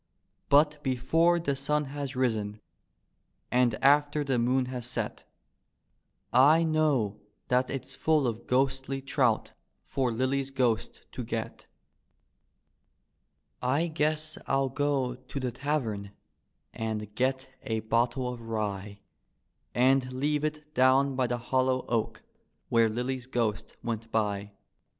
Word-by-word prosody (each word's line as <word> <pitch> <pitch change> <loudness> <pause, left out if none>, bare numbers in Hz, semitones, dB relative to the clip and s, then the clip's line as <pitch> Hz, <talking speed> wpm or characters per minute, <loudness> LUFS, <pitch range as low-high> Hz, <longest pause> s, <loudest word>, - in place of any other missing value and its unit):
But 150 +1 +4
before 160 +7 +2
the 145 -4 -1
sun 150 +2 0
has 140 -2 -4
risen 110 -5 -1 0.9
and 125 -2 +3
after 145 +1 +4
the 135 -4 0
moon 125 +2 +2
has 125 -2 -5
set 125 - -4 1.1
I 145 +6 +6
know 145 -10 +1 0.3
that 125 +1 +2
it's 135 -2 -5
full 155 -3 +2
of 115 -1 -3
ghostly 135 +1 +1
trout 135 - +1 0.3
for 130 -3 0
Lilly's 130 +3 0
ghost 120 -4 -1
to - - -5
get. - - -5 1.9
I 140 +6 +2
guess 155 0 -1
I'll 135 0 +2
go 135 -2 0
to 130 +2 -7
tlie 125 -2 -2
tavern 115 -8 -2 0.6
and 105 -2 -4
get 130 +3 -1
a 110 -1 -2
bottle 120 +3 +1
of 120 - -9
rye 105 -3 -4 0.7
And 130 +1 +3
leave 145 +3 0
it 150 0 -4
down 130 +1 +4
by 130 -1 +1
the 120 0 -1
hollow 130 +1 0
oak, 115 -2 -1 0.5
where 115 -1 +4
Lilly's 125 +3 -3
g^ost 115 -5 -2
went 115 -1 -4
by. 105 -2 -1
130 Hz, 120 wpm, -29 LUFS, 115-140 Hz, 1.9 s, I